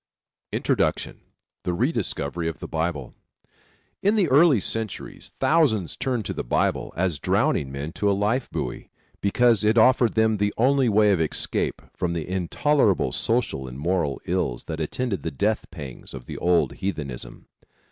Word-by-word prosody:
INTRODUCTION - - 0 0.4
THE 90 - -1
REDISCOVERY 85 - -1
OF 80 - -3
THE - - -6
BIBLE 80 -5 -3 0.9
In 205 +3 +3
the 200 -5 +3
early 150 +2 +6
Christian 100 - 0
centuries 110 -3 -5
thousands 125 - +2
turned 125 -5 -2
to - - -2
the - - -4
Bible, - - 0
as 85 -5 0
drowning 65 -2 +1
men 70 +3 -5
to 100 +4 0
a - - +3
life 115 +6 0
buoy, - - -5 0.3
because 115 +2 +3
it 110 +2 +3
offered 120 0 +5
them 110 -1 +3
the 105 0 0
only 130 +1 +3
way 105 0 +4
of 90 -4 +2
escape 80 - -1
from 85 -1 -2
the 80 -3 -3
intolerable 95 - +1
social 110 - 0
and 65 0 -8
moral 80 -3 0
ills - - -1
that 80 -1 -5
attended 100 +7 -2
the 80 - -3
death 105 +10 0
pangs 70 -7 -9
of 65 -2 -9
the - - -7
old 90 -1 +2
heathenism. 75 -10 -5
100 Hz, 160 wpm, -24 LUFS, 80-115 Hz, 0.9 s, early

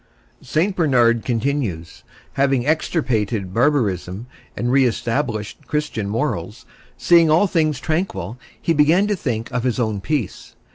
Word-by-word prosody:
St. 185 +5 0
Bernard 120 - +3
continues: 115 - -2 0.3
Having 135 -2 +1
extirpated 120 - -1
barbarism 110 - 0 0.3
and 120 +1 -1
re 135 +1 +4
established 115 -2 -2
Christian 150 -9 -2
morals, 105 - -3 0.3
seeing 170 -2 +5
all 160 +6 +4
things 155 -7 0
tranquil 155 - -3 0.2
he 165 - 0
began 160 +6 +4
to 205 0 0
think 120 - -3
of 125 0 -1
his 125 0 0
own 110 -4 -1
peace. 140 - -3
130 Hz, 130 wpm, -20 LUFS, 110-155 Hz, 0.3 s, seeing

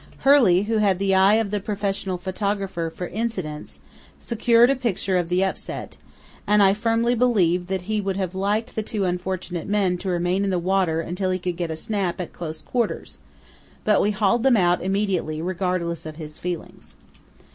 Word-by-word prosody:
Hurley, 235 -10 +6
who 220 +1 0
had 200 -3 +3
the 195 0 +1
eye 190 +2 +5
of 220 -3 0
the 210 - 0
professional 200 -2 -2
photographer 190 -2 -2
for 180 +2 -6
"incidents," 185 -9 -4 0.4
secured 235 +1 +3
a - - +2
picture 210 -6 -1
of 175 -2 0
the 180 +2 +2
upset, 190 - -4 0.5
and 210 0 +5
I 195 0 +5
firmly 230 +2 +1
believe 190 -8 +2
that 190 -1 -2
he 215 +2 -1
would 195 -1 -2
have 190 -2 -2
liked 205 +4 -1
the 220 - -1
two 210 -2 -2
unfortunate 180 -1 -3
men 195 -3 +1
to 190 - -4
remain 175 +2 0
in 200 - 0
the 185 - +1
water 175 -2 +1
until 180 +3 -2
he 185 - +1
could 180 -1 -3
get 170 -1 -3
a 160 - -3
"snap" 190 -1 -2
at 180 - -5
close 160 -2 -7
quarters; 240 -4 -3 0.6
but 210 - +3
we 205 - +2
hauled 210 +3 +2
them 255 -2 +4
out 175 -2 +3
immediately, 190 -5 -1
regardless 175 -2 -2
of 155 - -7
his 155 -1 -9
feelings. 175 -2 -6
190 Hz, 185 wpm, -23 LUFS, 180-210 Hz, 0.6 s, Hurley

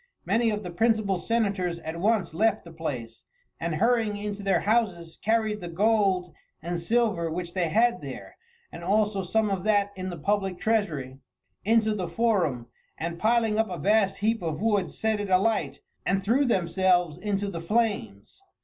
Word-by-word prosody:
Many 230 0 +2
of 210 -1 -2
the 180 - -6
principal 215 -1 +1
senators 200 -6 0
at 165 0 -6
once 205 -3 +1
left 215 +4 +1
the 170 - -11
place, 125 -8 -5 0.4
and 165 -1 -2
hurrying 225 +2 +2
into 205 0 -5
their 195 -4 +2
houses 190 -7 0
carried 220 -1 +1
the 175 - -5
gold 190 -1 +1 0.3
and 170 +2 -3
silver 210 -3 +1
which 170 +1 -4
they 175 -3 0
had 235 +6 +2
there, - - -8 0.4
and 170 - -9
also 205 +1 +1
some 210 +3 0
of 190 -2 -2
that 205 -2 +2
in 185 0 -4
the 175 - -6
public 195 +2 -1
treasury, 155 - -1 0.4
into 220 0 +3
the 185 -4 -3
forum, 170 - 0 0.3
and 170 +1 -4
piling 225 -1 +2
up 220 - +1
a 180 - -4
vast 200 +4 +2
heap 225 +1 +1
of 160 -3 -3
wood 205 -3 +1
set 220 -1 -1
it 205 -1 -3
alight 200 +4 +1 0.2
and 195 +1 0
threw 255 +8 +3
themselves 180 - +2
into 205 -1 -1
the 170 -4 -5
flames. 200 - -2
200 Hz, 170 wpm, -26 LUFS, 170-220 Hz, 0.4 s, into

